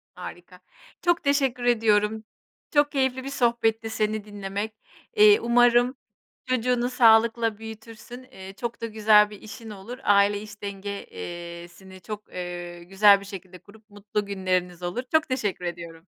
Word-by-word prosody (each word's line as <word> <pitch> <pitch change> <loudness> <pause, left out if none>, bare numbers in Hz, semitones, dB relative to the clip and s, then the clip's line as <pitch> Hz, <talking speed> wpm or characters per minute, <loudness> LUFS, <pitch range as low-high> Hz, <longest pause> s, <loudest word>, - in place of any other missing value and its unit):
Harika. - - -10 0.4
Çok 345 -2 +1
teşekkür 270 -3 +1
ediyorum. 220 -2 +2 0.5
Çok 290 -1 +2
keyifli 265 -2 0
bir 275 - -5
sohbetti 235 -4 0
seni 215 -1 -1
dinlemek. 205 +1 -5 0.4
Eee, 420 0 +7
umarım 245 +1 +4 0.5
çocuğunu 250 -1 0
sağlıkla 230 -2 +4
büyütürsün. 225 +2 -10
Eee, 190 -6 -12
çok 235 -1 -4
da 230 - -3
güzel 215 -1 +4
bir 210 - -11
işin 220 +1 -10
olur. 210 +5 -9
Aile 205 -1 +3
iş 215 0 -12
denge 200 0 -5
eee, 170 - -8
sini 190 +1 -15
çok 210 +2 -8
eee, 175 -1 -6
güzel 200 +2 +5
bir - - -11
şekilde 190 -2 -10
kurup 215 +3 -20
mutlu 205 0 -4
günleriniz 185 -3 -2
olur. 175 +8 -3
Çok 315 0 +3
teşekkür 210 -8 -2
ediyorum. 170 -1 -7
215 Hz, 145 wpm, -25 LUFS, 195-240 Hz, 0.5 s, Eee